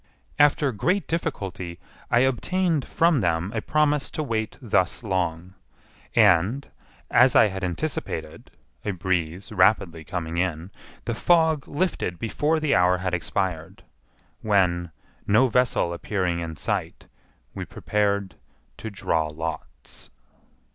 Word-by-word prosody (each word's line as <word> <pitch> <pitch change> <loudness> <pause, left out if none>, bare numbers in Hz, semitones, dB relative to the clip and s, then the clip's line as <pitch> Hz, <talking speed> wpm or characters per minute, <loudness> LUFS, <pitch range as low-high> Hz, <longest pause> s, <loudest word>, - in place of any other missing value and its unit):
After 145 -1 +4
great 180 - 0
difficulty 95 - -4 0.3
I 120 - +4
obtained 155 +4 +1
from 165 -5 +2
them 85 +1 0
a 110 - -2
promise 150 0 +1
to 155 - 0
wait 110 -5 -3
thus 95 -6 0
long; 90 -3 -2 0.6
and, 105 +5 +4 0.4
as 125 +1 +5
I - - +7
had 95 0 -6
anticipated 85 -3 -4 0.3
(a 100 - -2
breeze 90 0 -2
rapidly 90 -4 +2
coming 85 -1 -4
in), 85 0 -2 0.3
the 120 - -1
fog 160 +2 +2
lifted 145 - -2
before 150 - 0
the 155 -2 +1
hour 90 0 +4
had 90 -1 -3
expired, 90 +1 -3 0.6
when, 90 -5 +1 0.4
no 110 +6 +5
vessel 125 -8 +1
appearing 90 -1 -1
in 80 -1 -5
sight, - - -3 0.5
we - - -5
prepared 100 -2 -1 0.4
to 110 - -6
draw 80 -6 -1
lots. 80 +2 -7
100 Hz, 120 wpm, -24 LUFS, 85-130 Hz, 0.6 s, I